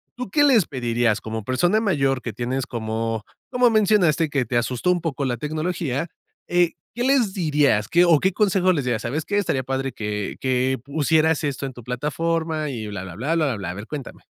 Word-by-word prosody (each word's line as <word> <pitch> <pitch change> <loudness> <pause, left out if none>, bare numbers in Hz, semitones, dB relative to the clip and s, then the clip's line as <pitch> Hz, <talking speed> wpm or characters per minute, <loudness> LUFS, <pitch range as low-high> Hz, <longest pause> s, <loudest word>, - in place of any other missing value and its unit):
¿tú 250 -3 -5
qué 290 +9 +3
les 250 - +5
pedirías 120 -4 0
como 110 0 -5
persona 175 - +2
mayor, 135 - +1
que 115 - -4
tienes, 125 +4 -2
como 115 -2 -3 0.3
como 250 -1 +4
mencionaste, 195 -8 +3
que 135 -3 0
te 120 +2 -1
asustó 120 +8 -1
un 180 - +1
poco 145 -4 -2
la 120 -2 -1
tecnología, 155 0 -2 0.4
eh, 175 -1 +3 0.2
qué 240 - -1
les 250 -7 +2
dirías? 145 - +2
¿Qué 175 +1 +4
o 170 -4 +5
qué 190 - +2
consejo 190 -2 +3
les 145 -5 -1
dirías?: 120 -3 -1
"¿Sabes 145 +7 -2
qué? 205 - -1
Estaría 155 -9 0
padre 135 +1 -2
que 105 -3 -4
que 130 0 +1
pusieras 155 +2 +2
esto 140 -1 -2
en 130 - -8
tu 120 - -11
plataforma", 155 +5 -2
y 110 -4 -5
blablabla, 100 - -3
blablabla. 125 - -1
A - - -3
ver, 105 +3 -7
cuéntame. 145 -5 -7
140 Hz, 190 wpm, -23 LUFS, 120-175 Hz, 0.4 s, les